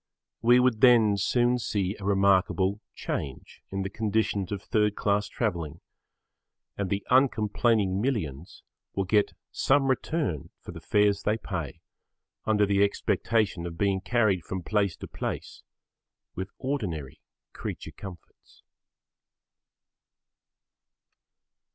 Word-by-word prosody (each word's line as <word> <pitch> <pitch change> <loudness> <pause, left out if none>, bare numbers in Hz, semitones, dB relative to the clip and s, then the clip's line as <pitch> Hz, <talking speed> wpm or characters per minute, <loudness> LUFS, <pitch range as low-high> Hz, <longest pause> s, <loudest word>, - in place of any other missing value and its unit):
We 120 +2 +6
would 125 -3 +2
then 115 -5 +6
soon 120 +4 +2
see 100 -3 -1
a - - -9
remarkable 100 0 +2
change 70 -1 -5
in 95 0 -2
the 95 - -3
conditions 105 -2 0
of 100 -1 -4
third 105 -2 +1
class 100 0 +1
travelling 85 - -3 1.0
and 100 -2 -2
the 100 +1 -2
uncomplaining 110 -5 +3
millions 90 - -3 0.3
will 95 - +1
get 105 +2 +2 0.2
some 135 0 +2
return 130 - -2
for - - -9
the - - -9
fares 105 -1 +2
they 105 +2 +1
pay 85 - -5 0.6
under 105 -1 +3
the 100 0 +3
expectation 100 -2 0
of 85 -1 -8
being 100 -1 +1
carried 105 -5 +2
from 95 +2 -5
place 100 -2 +1
to - - -8
place - - -5 0.7
with 95 +1 -5
ordinary 90 - -4 0.3
creature - - -6
comforts. 95 -5 -13
100 Hz, 115 wpm, -27 LUFS, 95-110 Hz, 1.0 s, We